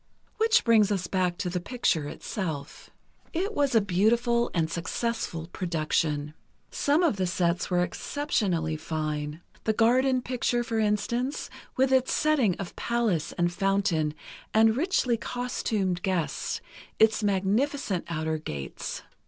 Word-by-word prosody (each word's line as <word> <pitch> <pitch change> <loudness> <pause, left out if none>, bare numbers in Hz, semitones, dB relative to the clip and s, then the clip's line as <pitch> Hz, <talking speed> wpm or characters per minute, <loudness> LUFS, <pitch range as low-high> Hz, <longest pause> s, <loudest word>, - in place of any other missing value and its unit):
Which 450 +1 +4
brings 220 -3 +4
us 190 -3 0
back 180 -1 0
to 200 - -2
the 180 0 -1
picture 170 - 0
itself. 155 -4 -5 0.4
It 385 +6 -1
was 285 - +1
a 225 - +6
beautiful 235 +5 +2
and 165 -2 +1
successful 170 +1 -3
production. 155 -3 -1 0.4
Some 295 +5 +2
of 310 - +2
the 185 -1 0
sets 175 -1 0
were 180 -1 +2
especially 180 - -1
fine: 155 0 -3 0.2
The 220 - +2
garden 250 +3 +3
picture, 240 -1 0
for 230 -1 -2
instance, 220 +6 -1 0.3
with 265 +1 +3
its 260 -1 +3
setting 280 - +3
of 195 - -7
palace 230 -9 0
and 175 0 0
fountain 175 -5 +1 0.4
and 220 0 +5
richly 270 -6 +1
costumed 220 -7 -2
guests, 185 -4 -1 0.4
its 220 0 +4
magnificent 205 +2 0
outer 160 -1 -1
gates. 70 - -6
200 Hz, 130 wpm, -27 LUFS, 170-240 Hz, 0.4 s, a